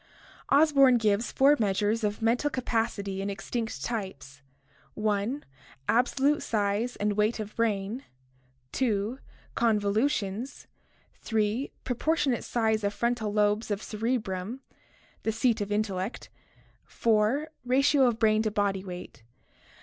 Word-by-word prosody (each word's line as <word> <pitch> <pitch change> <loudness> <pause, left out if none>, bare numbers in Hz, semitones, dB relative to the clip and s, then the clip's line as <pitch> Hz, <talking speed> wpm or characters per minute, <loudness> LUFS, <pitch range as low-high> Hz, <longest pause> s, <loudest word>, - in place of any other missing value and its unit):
Osborn 275 -4 +6
gives 215 0 +1
four 280 +2 +5
measures 210 +2 +1
of 210 +2 -1
mental 245 +6 +2
capacity 225 -7 -2
in 200 - -2
extinct 225 +3 -4
types: 145 - -5 0.6
(i) 215 +6 0 0.5
absolute 270 +5 +2
size 210 +3 -1
and 210 0 0
weight 215 +3 +1
of 215 -1 -6
brain, 220 +2 -1 0.7
(2) 225 0 -1 0.3
convolutions, 220 +1 0 0.5
(3) 220 +4 -1
propor 265 +6 0
tionate 265 -7 0
size 220 -2 0
of 200 0 -1
frontal 235 -3 0
lobes 210 +1 +1
of 205 0 -2
cerebrum, 220 0 -3 0.6
the 220 - 0
seat 225 0 +1
of 205 0 -3
intellect, 205 0 -2 0.6
(4) 230 +7 +1
ratio 270 +2 +4
of 235 -2 0
brain 215 -1 +3
to 220 - 0
body 200 -2 0
weight. 180 -8 -8
220 Hz, 120 wpm, -28 LUFS, 205-245 Hz, 0.7 s, Osborn